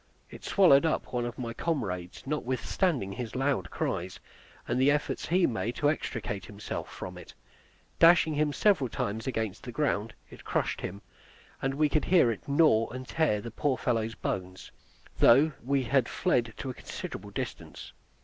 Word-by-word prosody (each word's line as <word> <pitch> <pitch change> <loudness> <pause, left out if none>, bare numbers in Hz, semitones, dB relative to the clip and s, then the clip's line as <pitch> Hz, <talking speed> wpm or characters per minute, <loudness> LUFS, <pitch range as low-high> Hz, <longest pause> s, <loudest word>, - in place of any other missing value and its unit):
It - - -11
swallowed 170 -8 +5
up 160 - -1
one 120 -1 0
of 120 - -7
my 115 -2 -4
comrades, 95 - -3
notwithstanding 135 - -1
his 115 +3 -6
loud 135 -9 0
cries, 90 +1 -3 0.5
and 125 +2 0
the 135 - +5
efforts 150 +1 0
he 180 +1 +3
made 115 +1 -2
to 145 0 +3
extricate 110 -9 -4
himself 105 0 -6
from - - -7
it; - - -13 0.6
dashing 165 -2 +6
him 150 0 +1
several 160 - +2
times 110 -2 -3
against 110 -6 -2
the 125 - -7
ground, 115 -5 -1 0.2
it - - -12
crushed - - -1
him, 100 +3 -6 0.6
and 135 0 -1
we 150 +1 +3
could 150 +1 0
hear 170 -10 +5
it 105 - -7
gnaw 140 -6 +4
and 130 +1 -7
tear 150 -11 +1
the 115 - -7
poor 130 +3 0
fellow's 115 -2 -1
bones, 90 0 -5 0.5
though 140 +7 +6
we 135 +1 +1
had 130 0 +2
fled 115 -2 0
to 130 - -4
a - - -8
considerable - - -7
distance. - - -6
125 Hz, 170 wpm, -29 LUFS, 110-145 Hz, 0.6 s, dashing